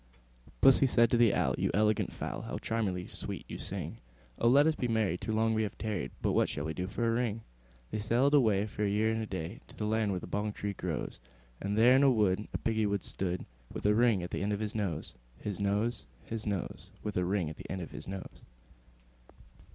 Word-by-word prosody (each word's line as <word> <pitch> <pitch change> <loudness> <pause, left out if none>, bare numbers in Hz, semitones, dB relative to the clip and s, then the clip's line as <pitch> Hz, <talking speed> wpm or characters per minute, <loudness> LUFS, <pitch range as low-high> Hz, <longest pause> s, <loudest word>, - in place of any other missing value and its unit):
II. - - -18
Pussy 135 0 +7
said 120 -2 +4
to - - +4
the 115 -3 +6
Owl, - - +2
"You - - +1
elegant 105 0 +2
fowl, - - -5
How - - -5
charmingly 100 -6 -1
sweet - - -6
you - - -7
sing! - - -5 0.4
Oh! 115 - +3
let 140 +5 +6
us 160 -1 +3
be 125 - -1
married; 110 -6 +1
too 105 +3 -3
long 110 +1 +2
we 110 - +1
have 105 - -3
tarried: 110 -4 -2
But - - +2
what - - +3
shall 70 - -3
we 80 - -2
do 90 +3 -3
for 115 +4 -1
a - - +3
ring?" 115 -2 0 0.5
They - - -2
sailed 120 +7 +2
away, 110 -8 +4
for 105 0 -4
a 100 - +2
year 110 +2 +2
and 110 0 -1
a 110 - -4
day, 95 +2 -5
To - - -13
the 105 - -2
land 110 0 +1
where 95 -2 -1
the - - -8
bong 105 +1 -2
tree 100 0 -3
grows; 90 -5 -4 0.4
And 100 +1 -1
there 120 +3 +7
in 135 - +5
a 140 - +6
wood 105 -4 +2
a - - -2
Piggy 110 -1 +1
wig 100 -1 -1
stood, 90 -1 -2 0.3
With - - -6
a 105 - +5
ring 115 -4 +3
at 90 - -6
the - - -2
end 105 +1 0
of 100 - -2
his 110 -1 -2
nose, 90 - -3 0.2
His 105 -2 -5
nose, 105 +4 0 0.2
His 110 -1 -4
nose, 100 -4 -3
With 105 - -3
a 90 - +2
ring 90 -3 0
at 80 - -10
the - - -10
end 95 - -3
of 85 - -7
his - - -7
nose. 95 -1 -7
105 Hz, 245 wpm, -31 LUFS, 95-115 Hz, 0.5 s, Pussy